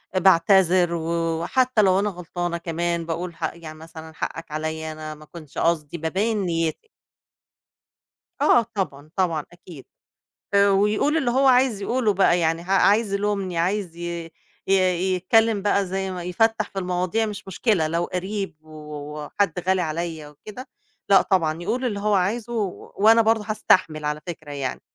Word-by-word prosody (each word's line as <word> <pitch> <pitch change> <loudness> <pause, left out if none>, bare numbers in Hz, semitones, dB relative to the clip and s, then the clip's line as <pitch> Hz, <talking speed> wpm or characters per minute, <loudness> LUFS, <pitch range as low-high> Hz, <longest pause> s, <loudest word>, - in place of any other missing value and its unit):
باعتذر 185 -1 +4
و 165 0 -1
وحتّى 255 +5 +2
لو 190 -1 +4
أنا 210 +1 0
غلطانة 175 -1 -4
كمان 170 0 -2
باقول 170 +1 -4
ح 160 -1 -3
يعني 160 -2 -10
مثلًا 160 0 -11
حقَّك 165 0 -6
عليّا 155 +1 -3
أنا 155 0 -7
ما 155 0 -15
كانش 155 -4 -11
قصدي. 165 -1 0
بابيّن 195 +8 -1
نيتي. 165 - -2 1.5
آه، 240 - +5
طبعًا، 155 -7 -4
طبعًا، 170 -6 0
أكيد، 170 -5 -13 0.7
آآ 200 0 +5
ويقول 210 +10 +2
اللي 270 -7 +1
هو 270 +3 +2
عايز 250 -5 +3
يقوله 235 -1 +1
بقى، 185 -2 +3
يعني 165 0 0
ع 185 - -9
عايز 205 +2 +3
يلومني، 200 -3 -1
عايز 180 -1 -1
ي 170 -1 -5 0.4
ي 195 - +3 0.4
يتكلّم 215 +3 +2
بقى 200 -1 +1
زي 190 +1 -3
ما 180 -1 -5
يفتَّح 215 +4 0
في 195 - -6
المواضيع 180 +4 -1
مش 205 -2 -7
مشكلة، 190 -4 +1
لو 170 +2 0
قَرِيب 190 0 -4
و 155 -1 -12 0.4
وحد 180 0 -1
غالي 190 0 +3
عليّا 160 -1 -4
وكده، 215 - -11 0.4
لأ 195 - +6
طبعًا، 165 -4 0
يقول 240 +7 -2
اللي 205 -5 -2
هو 210 0 +1
عايزه 210 +5 0
و 210 -6 -4
وأنا 225 +3 +6
برضه 220 -1 +2
هاستحمل 185 -7 +2
على 150 0 -2
فكرة 155 -4 -7
يعني. 135 -3 -4
180 Hz, 160 wpm, -23 LUFS, 165-205 Hz, 1.5 s, لأ